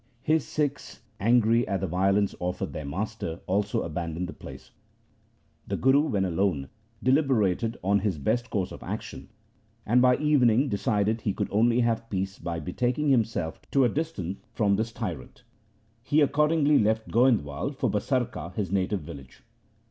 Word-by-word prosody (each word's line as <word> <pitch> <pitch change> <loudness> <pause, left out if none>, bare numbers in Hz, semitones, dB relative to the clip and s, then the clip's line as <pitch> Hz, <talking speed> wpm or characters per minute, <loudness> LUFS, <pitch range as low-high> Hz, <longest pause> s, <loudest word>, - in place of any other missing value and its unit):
His 155 -1 +1
Sikhs, 145 -5 -3 0.2
angry 115 +1 +3
at 95 - -1
the - - 0
violence 95 +3 +1
offered 90 0 -3
their 75 -2 -5
master, 95 0 -4
also 100 +2 0
abandoned 85 +2 -4
the - - -7
place. - - -12 1.0
The - - -2
Guru, 135 +2 +4
when 100 -6 0
alone, 85 -6 0 0.3
deliberated 120 - +2
on 100 +2 +3
his 100 -4 -1
best 120 - -1
course 95 -4 -2
of - - -9
action, - - -7 0.6
and 120 +3 +4
by 125 0 +5
evening 135 -3 +3
decided 105 +1 0
he 100 - -1
could - - -3
only 115 +3 +3
have 115 -1 0
peace 95 0 -3
by 85 0 -4
be 85 +3 -6
taking 125 +4 0
himself 110 - 0
to 135 -2 +3
a - - +3
distance 110 - -3 0.2
from 100 -2 +2
his 110 +3 -2
tyrant. 90 - -6 0.6
He 145 +5 +2
accordingly 150 +1 +3
left 110 +1 +1
Goindwal 115 - +1
for - - 0
Basarka, 105 - -2
his 100 -5 -2
native 95 0 0
village. 70 -4 -11
110 Hz, 155 wpm, -27 LUFS, 95-125 Hz, 1.0 s, by